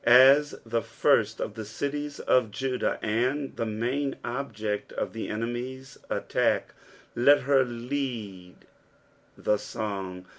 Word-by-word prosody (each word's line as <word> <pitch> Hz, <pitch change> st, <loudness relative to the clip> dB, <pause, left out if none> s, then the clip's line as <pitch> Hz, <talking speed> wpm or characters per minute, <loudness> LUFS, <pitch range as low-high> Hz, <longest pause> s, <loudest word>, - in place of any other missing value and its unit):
As 135 Hz, +5 st, +7 dB
the 115 Hz, 0 st, 0 dB
first -, -, +2 dB
of -, -, -3 dB
the 110 Hz, -, -6 dB
cities 145 Hz, +6 st, -4 dB
of 125 Hz, -4 st, +3 dB
Judah, 125 Hz, +4 st, -1 dB
and 130 Hz, +6 st, 0 dB
the 115 Hz, -, -2 dB
muD 125 Hz, +6 st, -1 dB
object 110 Hz, -5 st, -3 dB
of -, -, -3 dB
the 115 Hz, -, -4 dB
enemies' 125 Hz, +4 st, -4 dB
attack, -, -, 0 dB, 0.4 s
let 140 Hz, +5 st, +6 dB
her 135 Hz, 0 st, +4 dB
lead 120 Hz, -7 st, -4 dB, 0.8 s
the 105 Hz, -, +2 dB
song. 95 Hz, -4 st, -5 dB
120 Hz, 120 wpm, -27 LUFS, 110-135 Hz, 0.8 s, As